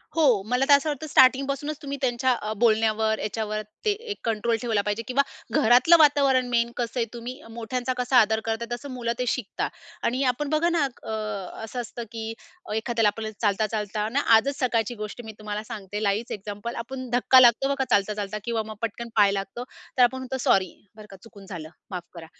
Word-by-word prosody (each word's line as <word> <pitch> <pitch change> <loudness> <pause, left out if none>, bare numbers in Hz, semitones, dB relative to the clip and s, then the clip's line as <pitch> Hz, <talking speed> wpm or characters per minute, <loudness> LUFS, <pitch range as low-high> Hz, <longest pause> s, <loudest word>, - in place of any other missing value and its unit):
हो. 270 -11 +4
मला 250 +2 +2
तर - - +9
असं 280 +2 +4
वाटतं 300 +1 -4
स्टार्टिंग 265 -1 +5
पासूनच 290 +2 -3
तुम्ही 280 -1 -5
त्यांच्या 255 0 +1
अ, 215 - -3
बोलण्यावर, 220 -1 +2
याच्यावर 215 0 -3 0.2
ते 425 - +4
एक 425 0 -5
कंट्रोल 230 +1 0
ठेवला 225 -4 +1
पाहिजे. 210 +2 -1
किंवा 265 +2 +3 0.4
घरातलं 255 +7 +6
वातावरण 280 -4 +4
मेन 235 0 +1
कसं 240 +1 -2
आहे, 230 - +2
तुम्ही 245 +3 -7
मोठ्यांचा 240 +3 -3
कसा 250 +1 +2
आदर 220 +1 +1
करता 225 +1 -2
तसं 240 +4 -5
मुलं 240 -2 -2
ते 250 - 0
शिकतात. 235 -3 -2 0.3
आणि 255 +3 0
आपण 290 +3 -4
बघा 315 +3 +2
ना 335 -4 +2 0.2
अ, - - -6 0.5
असं 245 +3 -4
असतं 240 +1 -8
अ, 230 - -5
की 225 -1 -5 0.4
एखाद्याला 225 0 +1
आपण 220 -1 -4
चालता-चालताना 215 +3 0 0.2
आजच 280 +5 -1
सकाळची 240 -2 0
गोष्ट 215 +2 -6
मी 220 - -7
तुम्हाला 210 0 -4
सांगते 210 -2 -6
लाईव्हच 205 +3 0
एक्झाम्पल. 205 +3 -6
आपण 255 +1 -6
धक्का 245 +2 +5
लागतो 245 +2 +5
बघा 270 - 0
चालता, 205 -2 +2
चालता 205 0 -4
किंवा 230 -2 -1
मग 215 0 -8
पटकन 230 +1 -4
पाय 205 -2 +5
लागतो, 195 +4 -4 0.3
तर 250 - +6
आपण 245 +2 +3
म्हणतो, 260 0 -4
"सॉरी, 190 -6 +2 0.2
बरं 215 -1 -12
का 195 - -11
चुकून 205 -4 -14
झालं. 160 -4 -7 0.2
माफ 180 -2 -4
करा." 170 -2 -9
235 Hz, 195 wpm, -25 LUFS, 215-260 Hz, 0.5 s, तर